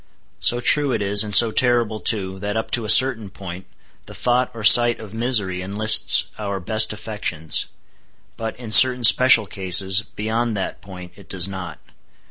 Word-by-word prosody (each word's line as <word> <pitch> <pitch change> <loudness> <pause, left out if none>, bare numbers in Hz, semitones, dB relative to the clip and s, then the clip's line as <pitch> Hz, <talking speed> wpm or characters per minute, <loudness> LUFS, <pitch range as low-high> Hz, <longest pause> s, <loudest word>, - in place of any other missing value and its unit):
So 120 - +1
true 145 +3 0
it - - -3
is, 100 +1 +1
and 105 - -8
so 115 -2 +5
terrible 120 -3 -1
too, 95 -4 -3
that 105 +2 -6
up 110 - -6
to 120 -3 -3
a - - -7
certain 115 -2 +3
point 95 -1 -12 0.4
the - - -13
thought 125 +1 -2
or 115 -3 -12
sight 120 +2 +4
of 110 -2 -13
misery 110 -6 -2
enlists 105 +4 +2
our 100 -2 -6
best 110 +4 +1
affections; 100 -7 -5 0.7
but, 115 -1 -8
in 120 -3 -11
certain 125 +2 +6
special 130 +4 +4
cases, 95 0 +1
beyond 110 +1 -4
that 95 - -7
point 90 -2 -13
it 95 -5 -19
does 95 -1 -3
not. 95 -4 -10
110 Hz, 170 wpm, -18 LUFS, 95-120 Hz, 0.7 s, certain